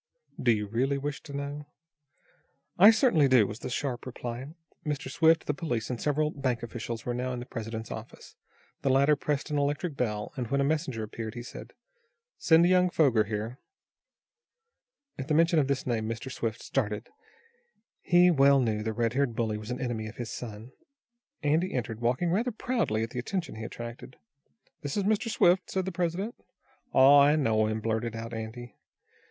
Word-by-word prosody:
"Do 120 - +4
you 105 -2 0
really 130 +7 0
wish 140 0 -4
to 145 - -11
know?" 145 +1 -5 1.1
"I 200 +4 +10
certainly 220 - +4
do," 130 -5 +5
was 105 +3 -6
the - - -5
sharp 125 -1 -3
reply. 125 +1 -6 0.4
Mr. 150 -2 -3
Swift, 160 0 +4
the 145 - 0
police 130 -7 -3
and 120 - -4
several 150 +1 +1
bank 130 -5 -2
officials 115 0 -5
were 120 - -1
now 125 +1 -2
in 125 - -4
the 120 - -7
president's 115 -2 -6
office. - - -9 0.5
The 135 - +1
latter 140 +3 +4
pressed 145 +1 -2
an 145 - +1
electric 145 +3 -1
bell, 105 -5 -2
and, 125 -3 -3
when 140 +4 0
a - - +3
messenger 140 -6 -1
answered, 110 +1 -6
he 120 - -6
said: - - -10 0.7
"Send 165 +1 +5
young 180 0 +4
Foger 130 -11 +3
here." 110 +5 -4 1.6
At 135 - -4
the 155 - +1
mention 165 0 +4
of 140 - +2
this 140 -1 -1
name, 115 -3 -1
Mr. 115 +3 -5
Swift 115 -3 -3
started. 105 -4 -2 0.9
He 180 0 +5
well 140 -2 +5
knew 110 -4 0
the 110 +1 -2
red 115 0 0
haired 135 -3 0
bully 110 -3 -1
was 110 +1 -9
an 125 - -3
enemy 120 -4 -3
of 110 - -9
his 120 -2 -5
son. 110 0 -7 0.7
Andy 155 +4 +1
entered, 115 -2 -3
walking 125 +9 +1
rather 230 +7 +1
proudly 220 - -1
at 115 - -5
the 125 - -4
attention 175 +7 -3
he 110 - -7
attracted. 120 +2 -8 0.7
"This 145 +3 -4
is 200 - +1
Mr. 215 +3 +1
Swift," 180 -3 +3
said 190 -1 -1
the 190 - -3
president. 180 +5 -2 0.6
"Aw, 135 +2 +7
I 145 +2 +5
know 110 -7 +2
him," 110 0 -2
blurted 115 +1 -2
out 115 +1 -6
Andy. 115 +1 -7
130 Hz, 185 wpm, -28 LUFS, 115-150 Hz, 1.6 s, I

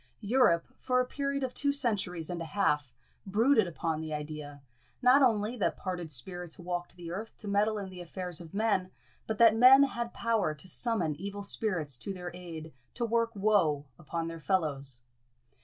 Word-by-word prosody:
Europe, 205 -7 +4
for 255 -1 +1
a 255 - +2
period 275 +1 -2
of 255 -1 -2
two 285 0 +2
centuries 205 - -1
and 175 -1 -4
a - - -3
half, 150 -7 0 0.4
brooded 220 +2 +4
upon 160 -1 -2
the 160 -1 -5
idea, 150 -2 -7 0.4
not 255 +2 +6
only 225 -2 +2
that 220 - 0
parted 180 -3 -4
spirits 175 +5 -3
walked 175 -1 -4
the 170 -2 -8
earth 215 +5 -6
to 215 - -10
meddle 210 +2 +2
in 200 -2 -4
the 185 -1 -9
affairs 180 0 -3
of 165 -2 -11
men, 200 -3 +1 0.4
but 220 - -2
that 230 -2 +7
men 255 +4 +8
had 235 -3 -2
power 220 -11 0
to 150 +5 -8
summon 185 - 0
evil 200 +3 -5
spirits 170 - -1
to 195 - -4
their 180 -1 -7
aid 165 -3 -8 0.2
to 240 - -1
work 230 0 +1
woe 190 -9 +2
upon 165 0 -4
their 165 0 -6
fellows. 140 -8 -1
185 Hz, 180 wpm, -30 LUFS, 165-225 Hz, 0.4 s, men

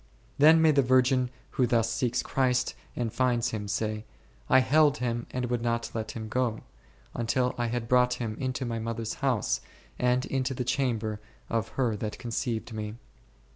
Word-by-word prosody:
Then 160 +3 +7
may 160 - +6
the 140 -2 +4
virgin 130 0 +3 0.2
who 125 - +2
thus 115 -1 +2
seeks 120 +1 0
Christ 130 -1 +1 0.2
and 115 -3 -2
finds 125 -2 +1
Him 105 -2 -4
say, 110 0 -2 0.3
/ - - -29
held 145 +3 +5
Him 120 -2 -2
and 125 -1 -2
would 120 -1 -1
not 115 0 -1
let 110 -1 -4
Him 110 -1 -5
go, 115 -1 -1 0.5
until 125 +2 0
I 120 -1 -1
had 115 0 -3
brought 125 0 +4
Him 110 -3 -4
into 130 -1 -2
my 115 -1 -2
mother 115 0 -3
s 110 - -3
house 130 -6 +1 0.4
and 125 +1 +2
into 135 0 -1
the 125 - -2
chamber 115 -6 -1 0.3
of 115 -1 0
her 120 -5 +1
that 105 +1 -4
conceived 115 -1 -3
me 105 -1 -4
1 115 - -14
120 Hz, 180 wpm, -28 LUFS, 115-130 Hz, 0.5 s, Then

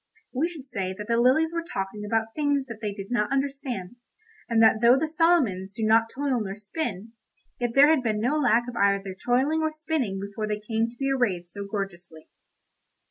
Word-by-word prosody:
We 280 +6 +1
should 310 -6 -10
say 190 -8 -3
that 210 0 -7
the 235 0 +2
lilies 315 +7 +3
were 335 - -1
talking 210 - -5
about 225 +1 -1
things 285 -2 +1
that 230 -4 -9
they 210 -2 -2
did 200 +1 -8
not 225 -2 0
understand, 270 -7 -3 0.5
and 230 -1 +2
that 220 0 +5
though 240 +2 +6
the 315 +3 0
Solomons 300 - +2
do 220 - -4
not 225 +1 +4
toil 270 -2 -1
nor 195 -2 -4
spin, 215 - -5 0.5
yet 240 -1 -2
there 285 +3 +7
had 315 -4 +3
been 220 -3 -1
no 250 +7 +1
lack 240 -4 +3
of 245 - -6
either 200 -3 +1
toiling 270 +6 +2
or 315 0 0
spinning 310 -10 -2
before 200 +2 -4
they 210 0 -2
came 225 +1 -1
to 240 - -16
be 275 +1 -1
arrayed 200 -10 0
so 200 +3 -7
gorgeously. 180 -6 -6
230 Hz, 200 wpm, -26 LUFS, 205-275 Hz, 0.5 s, there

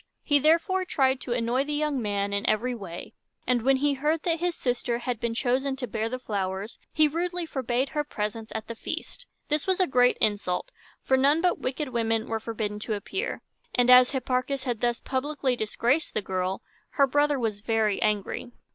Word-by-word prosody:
He 290 -2 +3
therefore 335 +5 +3
tried 265 -6 +1
to 240 - -2
annoy 240 +2 +1
the 295 +1 -3
young 295 -3 0
man 200 -1 -1
in 200 0 0
every 240 +4 +1
way; 190 -7 -8 0.3
and 245 -1 +2
when 270 +3 +4
he 285 +1 +2
heard 300 +3 0
that 335 -2 +1
his 350 0 0
sister 245 -1 -1
had 245 -1 -3
been 230 0 -2
chosen 265 +2 +1
to 260 -1 -3
bear 220 0 -2
the 255 - -3
flowers, 200 -3 -4
he 310 -1 +4
rudely 350 +3 -2
forbade 260 -3 -1
her 300 -1 -1
presence 220 -4 -4
at 220 - -3
the 230 - -4
feast. - - -6 0.2
This 300 +2 0
was 375 0 +2
a 370 - +5
great 250 -5 +3
insult, 205 -4 0 0.3
for 265 - +3
none 280 +4 +4
but 355 +1 +1
wicked 270 +2 -3
women 225 -2 0
were 225 0 -2
forbidden 215 -2 -4
to 215 0 -2
appear; 380 - -4 0.3
and, 245 0 +5
as 250 0 +8
Hipparchus 260 0 -1
had 240 -4 -2
thus 240 -1 +1
publicly 265 -1 -1
disgraced 240 +7 0
the 215 - +1
girl, 185 0 -2 0.3
her 280 - +5
brother 290 +1 +2
was 220 -5 -2
very 220 -2 +1
angry. 210 +3 -1
250 Hz, 195 wpm, -27 LUFS, 220-290 Hz, 0.3 s, as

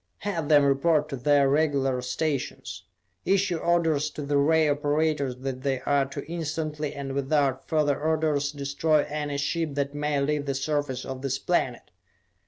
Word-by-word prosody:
"Have 170 -7 -3
them 145 -2 +6
report 150 +2 +2
to 140 - -3
their 140 +2 +3
regular 140 -3 +1
stations. 130 - -3 0.4
Issue 195 -2 +1
orders 160 -3 +1
to 150 - -7
the 145 +1 -1
ray 155 +2 +4
operators 145 -2 0
that 130 -1 -4
they 135 -1 -1
are 140 0 +1
to 140 +1 -7
instantly, 155 -2 -3
and 140 -1 -5
without 140 -1 0
further 150 -3 +1
orders, 155 -2 +1
destroy 145 +2 +1
any 145 -1 -3
ship 155 +1 -1
that 140 0 -1
may 145 0 -1
leave 145 +1 -1
the 140 - -1
surface 135 -2 -2
of 130 -1 -6
this 135 -1 -1
planet. 135 -7 -1
145 Hz, 160 wpm, -26 LUFS, 140-155 Hz, 0.4 s, them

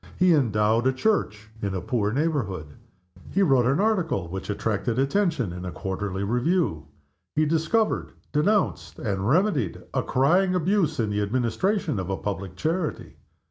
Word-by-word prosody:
He 180 -1 +5
endowed 115 -3 +2
a 130 - +3
church 110 - -1
in 100 -2 -2
a - - -1
poor 105 +3 -1
neighborhood. 110 - -1 0.6
He 200 - +2
wrote 135 -8 +4
an 135 +6 +2
article 185 - +1
which 95 +3 -6
attracted 110 +2 -1
attention 135 - +1
in 90 0 -7
a 90 - -4
quarterly 95 +3 -3
review. 120 - 0 0.5
He 155 - +3
discovered, 165 +8 +1 0.2
denounced, 150 - +1
and 100 -1 -2
remedied 155 - +1
a - - +1
crying 180 +8 +2
abuse 180 -3 +1
in 110 -2 0
the 105 0 0
administration 125 - 0
of 95 0 -4
a 95 - -1
public 95 -3 -4
charity. 160 - -2
125 Hz, 150 wpm, -25 LUFS, 100-165 Hz, 0.6 s, He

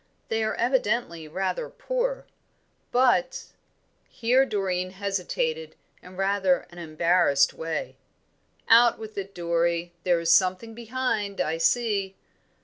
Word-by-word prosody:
They 225 0 0
are 220 - -1
evidently 235 - 0
rather 195 - -3
poor. - - -3 0.7
But 255 +1 +2 0.3
" - - -44 0.2
Here 255 +4 +2
Doreen 185 -4 -1
hesitated 200 - -3 0.3
in 180 +1 -13
rather 195 -2 +1
an 175 - -11
embarrassed 160 -3 +2
way. 160 -1 -5 0.7
"Out 235 +1 +6
with 220 -1 -9
it, 195 0 -8
Dorrie: 170 0 -1
there 175 -2 +2
is 165 0 +1
something 185 +4 +2
behind, 225 -4 -3
I 160 +1 -1
see." 200 -1 +1
200 Hz, 120 wpm, -26 LUFS, 175-240 Hz, 0.7 s, Out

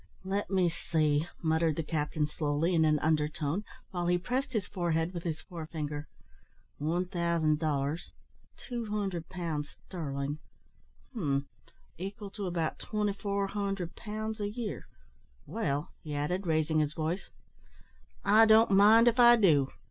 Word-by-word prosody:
"Let 200 +2 -1
me 185 -2 +3
see," 155 -2 +1 0.2
muttered 160 -1 +2
the 165 - -2
captain 150 0 -1
slowly, 150 +3 0
in 160 -2 +4
an 155 -1 +4
under 155 -1 +2
tone, 155 +5 -2 0.3
while 175 -2 -2
he 175 0 +3
pressed 255 +9 -2
his 215 -5 0
forehead 170 -2 -1
with 170 - -4
his 160 -2 -3
fore 165 -3 -8
finger; 150 -2 -4 0.7
"one 165 +5 0
thousand 170 -4 +1
dollars 150 0 -1 0.6
200 210 -8 -3
pounds 165 -5 -3
sterling 145 -3 -5 0.7
hum, 140 - 0 0.5
equal 200 +2 -6
to 200 -2 -4
about 170 -3 -2
2400 200 -3 -2
pounds 215 +1 -5
a 205 -1 -1
year. 220 -1 -5 0.6
Well," 140 +3 -2
he 150 -2 -5
added, 180 +6 -1
raising 155 -1 +2
his 150 0 0
voice, 165 +4 -2 1.0
"I 220 +2 +7
don't 220 0 +6
mind 215 +4 +7
if 240 +1 +3
I 240 0 +9
do. 155 - +4
170 Hz, 140 wpm, -31 LUFS, 155-200 Hz, 1.0 s, I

